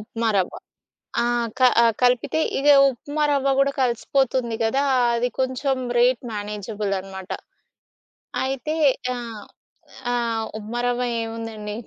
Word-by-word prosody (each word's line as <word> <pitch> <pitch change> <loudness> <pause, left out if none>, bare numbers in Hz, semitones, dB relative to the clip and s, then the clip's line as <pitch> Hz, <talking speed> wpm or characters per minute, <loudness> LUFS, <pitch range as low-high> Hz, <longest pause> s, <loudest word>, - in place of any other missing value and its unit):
ఉప్మారవ్వ. 215 -3 -1 0.7
ఆహ్, 240 -1 0
క - - -17 0.2
ఆహ్, 230 -1 +5
కలిపితే 250 +5 +2 0.2
ఇగ 285 +2 +1 0.2
ఉప్మా 290 +5 -3
రవ్వ 275 -1 +2
గూడా 275 0 +3
కలిసిపోతుంది 245 -1 0
గదా! 270 +5 +1 0.3
అది 240 +1 +1
కొంచెం 260 +1 0 0.2
రేట్ 245 0 +3
మేనేజబుల్ 205 0 -4
అనమాట. 190 0 -9 1.1
అయితే 270 +3 -2 0.4
ఆహ్, 230 -4 -7 0.7
ఆహ్, 230 -2 0
ఉప్మారవ్వ 240 +3 -2 0.2
ఏముందండి. 225 -2 -6
235 Hz, 105 wpm, -23 LUFS, 220-260 Hz, 1.1 s, ఆహ్